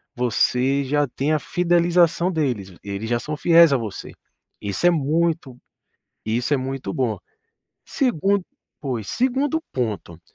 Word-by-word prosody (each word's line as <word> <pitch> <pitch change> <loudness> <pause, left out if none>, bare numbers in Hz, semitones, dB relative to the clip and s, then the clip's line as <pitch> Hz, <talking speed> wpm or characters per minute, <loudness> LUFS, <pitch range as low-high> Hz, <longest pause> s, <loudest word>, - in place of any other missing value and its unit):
você 125 +3 +1
já 145 +2 +1
tem 140 +4 -2
a 155 - +2
fidelização 175 +1 +2
deles, 120 - -2
eles 100 +3 -5
já 120 - +1
são 150 +6 -4
fiéis 170 -3 +6
a - - +3
você, 110 -5 -6 0.5
isso 100 - -2
é 175 - +7
muito 160 -3 0 0.7
isso 120 +6 0
é - - +3
muito 130 -6 -4
bom. 115 -7 -1 0.7
Segundo 200 - +1 0.4
pois, 125 -8 -3
segundo 270 +5 0
ponto, 105 -9 -3
140 Hz, 135 wpm, -22 LUFS, 120-170 Hz, 0.7 s, é